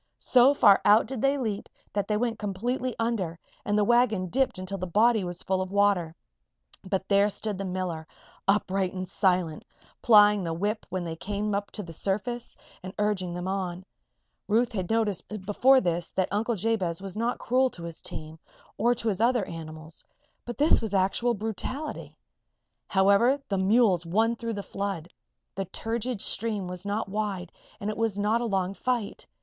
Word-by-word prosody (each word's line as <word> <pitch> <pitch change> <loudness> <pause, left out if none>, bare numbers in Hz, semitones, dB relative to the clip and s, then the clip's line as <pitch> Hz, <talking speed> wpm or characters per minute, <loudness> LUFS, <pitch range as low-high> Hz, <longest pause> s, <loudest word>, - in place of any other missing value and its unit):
So 255 +3 +5
far 200 -7 +6
out 210 +2 +6
did 250 -1 -5
they 275 +1 +2
leap 220 -6 -3 0.2
that 205 -1 -1
they 210 - +1
went 230 -1 -1
completely 240 +5 -2
under 220 -8 -1 0.3
and 205 0 0
the 210 - +4
wagon 220 -5 +2
dipped 265 0 +1
until 185 +1 -5
the 185 - -3
body 220 +4 +3
was 175 0 -4
full 190 0 0
of 185 0 -4
water. 200 -5 +2 0.7
But 190 0 -2
there 200 +1 +4
stood 205 -1 -4
the 195 - -3
miller, 180 -4 -3 0.4
upright 195 -2 +1
and 185 -1 -4
silent, 180 -4 +1 0.4
plying 210 -3 +6
the 165 -1 -2
whip 210 +5 -2
when 185 -1 -3
they 165 -1 -4
came 205 +3 -2 0.2
to 210 - -4
the 165 -2 -9
surface, 215 +8 -3 0.2
and 185 0 -8
urging 190 -4 -1
them 180 +1 -4
on. 185 -1 -3 0.6
Ruth 230 +3 +2
had 190 -5 -3
noticed 220 -5 0 0.2
before 260 +6 +5
this 175 -5 -1
that 185 - -1
Uncle 225 +3 0
Jabez 190 -5 -1
was 195 -1 -7
not 230 +3 -1
cruel 255 +2 +2
to 175 - -11
his 170 -1 -8
team, 155 +1 -7 0.4
or 240 +3 +3
to 230 - -4
his 205 -1 0
other 240 -3 +3
animals; 160 -1 -9 0.4
but 240 - -6
this 295 +3 +4
was 215 -3 -2
actual 195 +6 +2
brutality. 225 +8 -4 0.7
However, 200 +8 +4
the 195 -2 0
mules 195 -2 +3
won 220 +7 +1
through 230 0 -4
the 200 - -4
flood. 195 -5 -4 0.4
The 195 +1 -3
turgid 225 +3 -3
stream 210 -4 -2
was 180 +2 -7
not 210 +2 -1
wide 200 -3 -3 0.3
and 205 +1 -2
it - - -7
was 225 -3 0
not 215 +3 +1
a - - -1
long 195 -3 0
fight. 235 -1 -3
205 Hz, 175 wpm, -27 LUFS, 185-225 Hz, 0.7 s, far